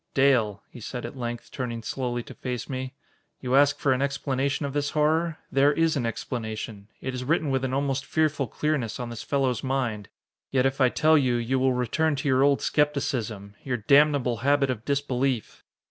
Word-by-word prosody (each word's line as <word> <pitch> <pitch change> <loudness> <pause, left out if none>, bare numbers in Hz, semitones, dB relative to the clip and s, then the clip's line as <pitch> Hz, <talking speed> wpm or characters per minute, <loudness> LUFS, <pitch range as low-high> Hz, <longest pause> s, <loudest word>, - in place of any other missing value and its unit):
"Dale," 120 -7 +3
he - - -12
said 120 +2 -6
at - - -7
length, 120 -2 -5
turning 120 -3 -4
slowly 120 -1 -3
to - - -11
face 125 -2 -5
me, 130 0 -5 0.4
"you 130 0 0
ask 145 +1 +5
for 140 -2 +2
an 130 - -1
explanation 140 0 -1
of 140 - -4
this 145 0 0
horror? 155 +2 +1
There 140 +1 +4
is 165 +1 +2
an 125 -5 0
explanation. 110 -3 -5
It 130 - -3
is 125 0 -4
written 155 +1 +1
with 135 0 0
an 130 - -1
almost 135 0 0
fearful 155 -4 +1
clearness 145 -3 -2
on 120 -1 -4
this 115 -1 -6
fellow's 135 -4 0
mind. 125 -6 -2 0.4
Yet 130 -1 +2
if 135 +1 0
I 130 - +6
tell 155 +3 +4
you, 125 -3 +1
you 120 +3 0
will 130 0 +3
return 145 +6 +1
to 145 +2 -3
your 130 -1 +3
old 140 0 +3
skepticism 120 -9 -1
your 125 -2 -1
damnable 140 +1 +3
habit 140 +2 +2
of 110 -3 -6
disbelief!" 135 -4 -1
130 Hz, 190 wpm, -26 LUFS, 120-140 Hz, 0.4 s, I